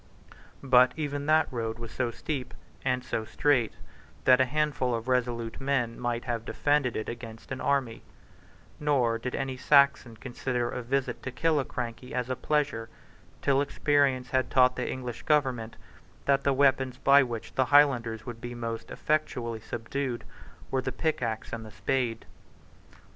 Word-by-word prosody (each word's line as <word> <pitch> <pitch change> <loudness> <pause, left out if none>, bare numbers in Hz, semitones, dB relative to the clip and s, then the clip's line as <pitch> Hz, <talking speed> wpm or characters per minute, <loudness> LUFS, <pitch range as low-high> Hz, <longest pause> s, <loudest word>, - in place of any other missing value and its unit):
But 125 -1 +5
even 145 -2 -3
that 155 +1 +4
road 115 -2 -2
was 115 -1 -8
so 130 -2 -1
steep 130 +2 -5 0.3
and 125 -1 0
so 115 -3 -2
strait 125 0 +1 0.5
that 130 0 +6
a - - +5
handful 140 -3 0
of 115 +1 -5
resolute 120 -2 -1
men 130 -4 0
might 120 -1 -2
have 120 -3 -2
defended 145 -1 +1
it 110 - -3
against 115 -1 -8
an 130 - -4
army; 135 -5 0 0.8
nor 130 -6 +2
did 125 +2 -4
any 130 -1 -3
Saxon 140 -4 +4
consider 125 -1 -2
a - - -4
visit 130 0 -1
to 130 - -5
Killiecrankie 130 -4 -2
as 125 0 -2
a - - 0
pleasure, 145 -6 -1 0.5
till 140 -1 +3
experience 140 -3 +1
had 130 -1 +1
taught 125 -1 +4
the - - -2
English 125 -3 -5
Government 130 -7 +1 0.5
that 140 0 +3
the 140 - +3
weapons 130 -2 +2
by 140 +2 +6
which 120 -4 -4
the 130 - +2
Highlanders 125 -6 +4
could 115 -1 -8
be 120 0 -6
most 115 -1 -5
effectually 125 -7 -1
subdued 120 +3 -4 0.5
were 130 - +1
the - - -3
pickaxe 125 -9 -2
and 115 -1 -4
the 110 - -9
spade. 120 0 -1
125 Hz, 155 wpm, -28 LUFS, 115-140 Hz, 0.8 s, that